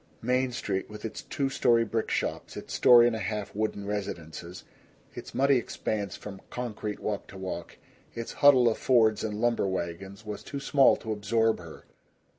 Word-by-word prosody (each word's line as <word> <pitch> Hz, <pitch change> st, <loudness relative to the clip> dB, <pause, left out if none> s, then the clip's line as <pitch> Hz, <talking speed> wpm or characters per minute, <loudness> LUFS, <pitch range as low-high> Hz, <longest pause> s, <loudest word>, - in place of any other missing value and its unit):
Main 125 Hz, +2 st, +1 dB
Street 95 Hz, -5 st, -3 dB
with 105 Hz, +1 st, -8 dB
its 110 Hz, -, -5 dB
two 135 Hz, -1 st, -2 dB
story 115 Hz, -3 st, +3 dB
brick 110 Hz, 0 st, -2 dB
shops, -, -, -2 dB
its -, -, -7 dB
story 120 Hz, -1 st, +7 dB
and 120 Hz, -1 st, +2 dB
a -, -, -3 dB
half 105 Hz, -2 st, -3 dB
wooden 105 Hz, -1 st, -2 dB
residences, 90 Hz, -4 st, -5 dB, 0.5 s
its -, -, -9 dB
muddy 140 Hz, 0 st, +4 dB
expanse 105 Hz, -4 st, -3 dB
from 100 Hz, -2 st, -9 dB
concrete 110 Hz, -4 st, -4 dB
walk 105 Hz, -2 st, -3 dB
to 95 Hz, -, -11 dB
walk, 90 Hz, -3 st, -6 dB, 0.4 s
its 115 Hz, 0 st, -5 dB
huddle 135 Hz, -4 st, +7 dB
of 115 Hz, -, +1 dB
Fords 110 Hz, -4 st, +3 dB
and 105 Hz, -1 st, -3 dB
lumber 120 Hz, -3 st, +1 dB
wagons, 95 Hz, +3 st, -5 dB
was 105 Hz, -1 st, -5 dB
too 140 Hz, -, -6 dB
small 140 Hz, -1 st, +5 dB
to 110 Hz, -, -6 dB
absorb 110 Hz, +2 st, +1 dB
her. 85 Hz, -2 st, -11 dB
110 Hz, 175 wpm, -28 LUFS, 100-120 Hz, 0.5 s, story